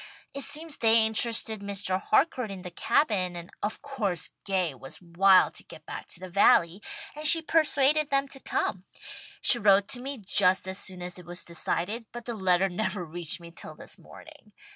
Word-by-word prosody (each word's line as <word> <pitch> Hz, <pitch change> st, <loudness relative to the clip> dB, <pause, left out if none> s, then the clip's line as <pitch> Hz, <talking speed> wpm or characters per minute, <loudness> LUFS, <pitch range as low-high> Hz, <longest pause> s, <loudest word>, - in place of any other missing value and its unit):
It 280 Hz, -, -6 dB
seems 310 Hz, +2 st, -1 dB
they 225 Hz, -1 st, +4 dB
interested 220 Hz, -1 st, +1 dB
Mr. 195 Hz, -2 st, -2 dB
Harcourt 255 Hz, -2 st, +1 dB
in 190 Hz, -2 st, -8 dB
the 180 Hz, -, -7 dB
Cabin, 185 Hz, -, +1 dB
and 170 Hz, +1 st, -9 dB
of 210 Hz, +6 st, -4 dB
course 220 Hz, -11 st, -3 dB
Gay 185 Hz, -6 st, -1 dB
was 135 Hz, +1 st, -12 dB
wild 185 Hz, +2 st, +4 dB
to -, -, -7 dB
get 155 Hz, -, -14 dB
back -, -, -8 dB
to -, -, -11 dB
the 185 Hz, -, -8 dB
Valley, 180 Hz, 0 st, +3 dB, 0.3 s
and 300 Hz, +1 st, 0 dB
she 330 Hz, +1 st, +10 dB
persuaded 305 Hz, -2 st, +2 dB
them 275 Hz, 0 st, +1 dB
to 270 Hz, -, -8 dB
come. 190 Hz, -7 st, -3 dB, 0.6 s
She 240 Hz, -, +4 dB
wrote 200 Hz, -1 st, +4 dB
to 245 Hz, -, -6 dB
me 275 Hz, +2 st, -5 dB
just 190 Hz, -2 st, +3 dB
as 190 Hz, +1 st, -4 dB
soon 185 Hz, -2 st, -7 dB
as 180 Hz, 0 st, -7 dB
it 175 Hz, -, -14 dB
was 175 Hz, +1 st, -4 dB
decided, 195 Hz, +6 st, -4 dB
but 240 Hz, -1 st, -9 dB
the 240 Hz, -, -4 dB
letter 190 Hz, -2 st, +2 dB
never 185 Hz, 0 st, -3 dB
reached 165 Hz, +1 st, -6 dB
me 170 Hz, 0 st, -12 dB
till -, -, -10 dB
this -, -, -9 dB
morning. -, -, -16 dB
200 Hz, 190 wpm, -27 LUFS, 180-245 Hz, 0.6 s, she